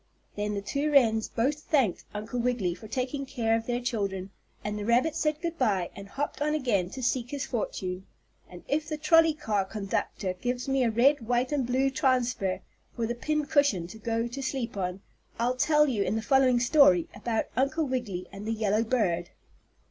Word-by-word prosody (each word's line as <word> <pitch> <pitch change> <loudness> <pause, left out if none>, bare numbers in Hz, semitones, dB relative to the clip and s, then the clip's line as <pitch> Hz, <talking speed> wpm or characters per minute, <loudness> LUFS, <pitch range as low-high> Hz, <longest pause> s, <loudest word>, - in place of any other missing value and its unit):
Then 210 0 -2
the 200 - -3
two 280 +8 -1
wrens 225 -6 +4
both 275 +6 0
thanked 270 - +1
Uncle 215 +4 -4
Wiggily 235 -7 0
for 215 +5 -11
taking 260 +4 -2
care 235 -4 0
of 225 0 -3
their 245 0 0
children, 200 -6 -3 0.3
and 210 0 -3
the - - -4
rabbit 245 +8 +2
said 305 -1 0
good 335 -1 -3
by 200 -8 +1
and 200 -1 -9
hopped 285 +5 -4
on 300 +1 +1
again 215 -11 0
to 260 +5 -7
seek 245 0 0
his 280 -1 -3
fortune. 190 -5 -4 0.4
And 180 -1 -11
if 300 +2 -1
the 305 - -2
trolley 320 +1 +5
car 210 -9 0
conductor 195 -1 -3
gives 245 +7 -3
me 270 -1 +2
a 235 - +3
red, 240 +2 +3
white 245 +2 +1
and 275 -5 0
blue 265 +2 +2
transfer, 250 -8 +1 0.3
for 235 - -1
the 235 - -1
pin 300 +5 -1
cushion 285 - +2
to 220 - -10
go 230 +1 -1
to 260 +3 -6
sleep 260 -4 -3
on, 185 0 -3 0.4
I'll 240 +2 +1
tell 300 +3 +4
you 235 -7 0
in 205 - 0
the 220 - -2
following 260 -2 +4
story 240 - +5
about 225 +2 -1
Uncle 280 +6 +1
Wiggily 240 -9 -3
and 200 +2 -8
the 225 - 0
yellow 215 0 +1
bird. 185 -8 0
240 Hz, 195 wpm, -28 LUFS, 210-275 Hz, 0.4 s, trolley